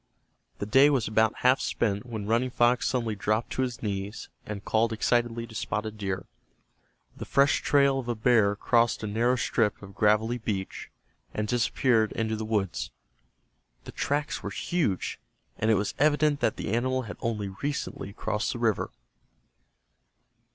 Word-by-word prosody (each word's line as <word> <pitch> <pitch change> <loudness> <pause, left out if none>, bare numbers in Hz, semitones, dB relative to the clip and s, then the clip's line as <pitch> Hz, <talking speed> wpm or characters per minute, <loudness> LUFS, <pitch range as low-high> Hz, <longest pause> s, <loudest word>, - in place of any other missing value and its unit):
The - - -3
day 135 +7 +6
was 135 -6 +1
about 110 +1 +2
half 130 +1 +6
spent 105 +1 -1
when 110 -4 -5
Running 115 +4 +1
Fox 120 0 +2
suddenly 115 -4 0
dropped 110 +3 -1
to - - -1
his 125 -3 -3
knees, 100 0 -4 0.2
and 100 -1 -6
called 115 +1 +2
excitedly 115 +1 0
to 115 - -14
Spotted 110 0 -3
Deer. 95 -2 -3 0.9
The - - -7
fresh 140 +1 +3
trail 140 -1 +3
of 125 - -6
a 120 - -1
bear 110 -2 +3
crossed 115 +2 +2
a - - -1
narrow 115 +4 +1
strip 115 -3 0
of 100 0 -10
gravelly 105 +4 +2
beach 100 -4 -4 0.5
and 105 0 -1
disappeared 115 -1 +2
into 110 -1 -1
the 110 0 -4
woods. 105 -4 -1 0.9
The - - -9
tracks 145 +1 -2
were - - -4
huge, 160 - -1 0.4
and 110 - +1
it 110 - +5
was 100 +1 -1
evident 150 0 +3
that 110 - +1
the 100 - -4
animal 130 +2 0
had 105 -4 -8
only 105 -4 -2
recently 110 -1 -4
crossed 105 0 -2
the - - -5
river. 115 -4 0
115 Hz, 160 wpm, -27 LUFS, 105-125 Hz, 0.9 s, day